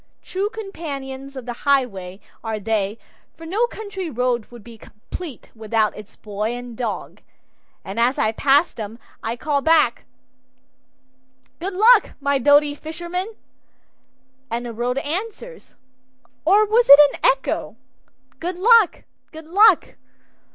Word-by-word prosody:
True 390 +2 -2
companions 280 -10 -7
of 260 -3 -7
the 245 - -4
highway 205 -10 0 0.2
are 220 -2 -3
they, 210 0 -1 0.4
for 330 - -11
no 420 +8 0
country 405 -6 -6
road 245 -3 -1
would 240 -3 -13
be 235 +1 -12
complete 255 +8 -10
without 220 -1 -1
its 210 0 -12
boy 210 +2 -4
and 245 -1 -8
dog, 230 -3 -5 0.6
and 195 +4 -5
as 245 +3 +2
I 215 - +1
pass 280 +7 +3
them 220 0 -7 0.2
I 225 +1 -3
call 285 +2 -1
back, 315 -6 +2 1.5
"Good 370 +3 -4
luck, 440 +3 +5
my 280 -1 +1
doughty 290 +2 +4
fisherman," 345 +7 -6 1.1
and 235 +1 -3
the 235 - -6
road 245 +3 -2
answers 420 - -6 0.7
or 405 +6 +5
was 455 +3 +2
it 280 +1 +11
an - - -9
echo? 265 - +1 0.6
"Good 350 +1 -4
luck, 450 0 +4 0.3
good 315 0 -11
luck." 400 +7 +4
275 Hz, 130 wpm, -21 LUFS, 230-360 Hz, 1.5 s, it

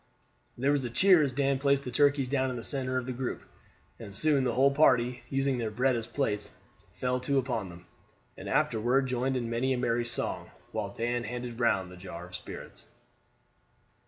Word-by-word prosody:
There 135 +4 +1
was 145 -2 +1
a 120 - -3
cheer 180 +7 +5
as 140 -3 +1
Dan 135 +1 0
placed 140 0 +2
the 125 - -6
turkeys 140 +1 +2
down 130 0 0
in 125 - -4
the 115 - -6
center 130 -1 +5
of 130 - -2
the 130 - -4
group, 125 0 -4 0.6
and 100 -4 -8
soon 145 +1 +2
the 120 - 0
whole 135 +2 +4
party, 125 -4 +3
using 135 -1 0
their 115 -2 -2
bread 125 +4 +1
as 115 -1 -4
plates, 120 -5 -2 0.4
fell 125 0 -2
to 135 +2 0
upon 120 -7 -1
them, 85 +1 -13 0.5
and - - -8
afterward 120 +5 +1
joined 130 +1 -1
in 120 -2 -3
many 120 +3 0
a - - -1
merry 120 -1 0
song, 120 - -3 0.2
while - - -3
Dan 120 +1 -2
handed 120 0 -6
round 105 -7 +1
the 90 - -11
jar 90 -1 -8
of 90 0 -10
spirits. - - -10
125 Hz, 195 wpm, -29 LUFS, 115-135 Hz, 0.6 s, cheer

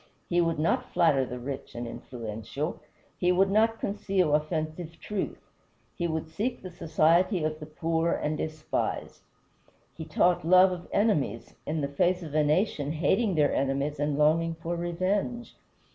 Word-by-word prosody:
He 175 0 +4
would 165 -1 +1
not 155 +3 0
flatter 140 -6 +3
the 125 - -5
rich 130 +1 -6
and 120 0 -4
influential. 115 +6 -5 0.4
He 180 0 +3
would 190 +2 +3
not 225 +2 +3
conceal 195 -5 0
offensive 155 +2 -2
truth. 210 -2 -3 0.6
He 175 - -1
would 160 -1 -2
seek 210 +11 -2
the 185 - -7
society 165 +2 +2
of 155 0 -2
the 150 - -8
poor 165 +2 0
and 150 +1 -1
despised. 155 0 -3 0.7
He 160 - -7
taught 175 +2 +2
love 185 +3 +6
of 175 -1 -6
enemies 175 - 0
in 155 0 -1
the 140 - 0
face 175 +6 +1
of 155 -3 -8
a 155 0 +3
nation 150 -2 +1
hating 190 +5 +1
their 150 -2 +3
enemies 140 +2 -1
and 145 -1 0
longing 165 +2 +3
for 165 +1 -4
revenge. 190 +8 -2
165 Hz, 160 wpm, -28 LUFS, 150-180 Hz, 0.7 s, love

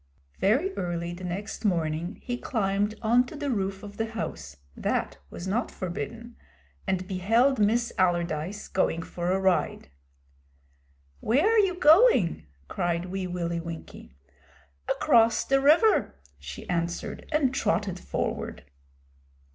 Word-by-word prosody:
Very 275 - +2
early 175 -1 -3
the 180 +1 -9
next 190 +6 -5
morning 170 -1 -1
he 245 - -2
climbed 205 -3 -1
on 235 +3 +4
to 315 - -9
the 290 -2 -2
roof 195 -3 -2
of 205 0 -10
the 225 - -1
house 85 - -6 0.2
that - - -2
was 175 - -7
not 225 +7 0
forbidden 185 +7 -6 0.5
and 185 -1 -1
beheld 225 +8 +2
Miss 230 +3 +2
Allardyce 175 +1 0
going 165 -3 0
for 175 +1 -3
a 190 - +2
ride. 190 - 0 1.3
'Where 265 - +2
are 450 0 +4
you 385 -3 +2
going?' 315 - +5 0.2
cried 175 - -2
Wee 190 -1 -3
Willie 170 -1 -2
Winkie. 165 - -9 0.7
'Across 230 -1 +3
the 270 0 +2
river,' 325 - +4 0.2
she 70 -1 -9
answered, 170 -1 -3
and 290 -4 +2
trotted 205 -6 0
forward. - - -4
195 Hz, 130 wpm, -27 LUFS, 175-240 Hz, 1.3 s, going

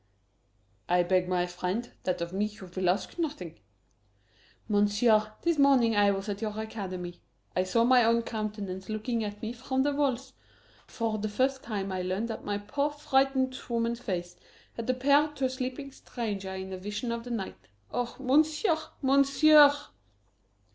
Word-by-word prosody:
"I 175 0 +4
beg, 185 0 +1
my 180 -1 +1
friend, 180 +6 -3
that 185 -2 -1
of 170 +1 -4
me 200 +2 +1
you 210 -3 -8
will 185 -1 +1
ask 190 - -1
nothing." 190 - -4 1.1
"Monsieur, 215 +1 +3
this 335 -3 +1
morning 260 -5 +5
I 205 0 +5
was 195 +1 -2
at 205 -1 -4
your 215 -1 -3
Academy. 185 -5 -6 0.3
I 185 - +2
saw 230 +5 +2
my 250 0 +5
own 230 +1 +3
countenance 210 -4 -5
looking 220 +2 -2
at 210 +1 -6
me 225 +2 -3
from 260 +2 -1
the 290 0 +1
walls. 270 -3 -1 0.5
For 225 -2 -2
the 215 +1 -2
first 260 +5 0
time 200 -4 -4
I 185 -1 -2
learned 190 +6 -2
that 225 - -5
my 205 0 -2
poor, 280 +9 -1
frightened 270 -3 +1
woman's 235 0 0
face 180 -7 -4 0.4
had 230 +1 -6
appeared 285 +4 +3
to 275 - -1
a - - +1
sleeping 260 +2 -5
stranger 205 -8 -5
in 190 0 -6
a - - -4
Vision 210 +5 -4
of 235 0 -3
the 245 - -9
Night. 225 -5 -5 0.2
Oh, 245 -1 -2
Monsieur, 310 +6 +2 0.2
Monsieur!" 280 +2 +6
225 Hz, 165 wpm, -29 LUFS, 195-265 Hz, 1.1 s, Monsieur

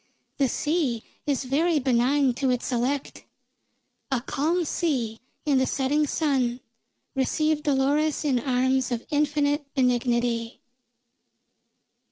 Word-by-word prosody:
The 275 - +3
sea 295 -6 0 0.2
is 280 -2 0
very 310 +6 +1
benign 260 +1 +2
to 265 +2 -1
its 250 +1 -1
elect; 255 +3 -2 0.9
a 265 -3 +1
calm 320 +8 0
sea 255 -10 -1 0.3
in 285 -3 +3
the 260 - +1
setting 290 +2 +1
sun 260 -6 0 0.5
received 305 +3 0
Dolores 290 +2 +1
in 265 -4 +2
arms 260 0 +1
of 235 -1 -3
infinite 290 -1 +1
benignity. 240 -2 0
270 Hz, 110 wpm, -25 LUFS, 250-295 Hz, 0.9 s, The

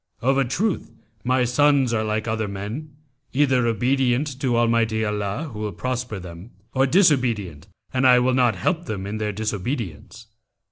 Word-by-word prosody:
Of 135 +3 +2
a - - +4
truth 190 - -1 0.3
my 130 +1 +2
sons 135 0 +3
are 110 -1 +1
like 110 +1 -2
other 110 -1 -1
men, 105 +10 -6 0.4
either 130 -3 +3
obedient 130 +4 +1
to 125 -4 +1
Almighty 115 -1 +2
Allah 105 +8 -3
who 105 - -7
will 105 -1 -3
prosper 125 -3 -3
them, 90 +2 -10 0.2
or 135 +1 +3
disobedient 125 - +2 0.3
and 130 0 +3
I 125 -1 +7
will 125 +1 +2
not 125 -4 +3
help 170 - -1
them 100 - -4
in 105 +2 -4
their 105 -1 -1
disobedience. 110 - -4
120 Hz, 160 wpm, -23 LUFS, 105-130 Hz, 0.4 s, I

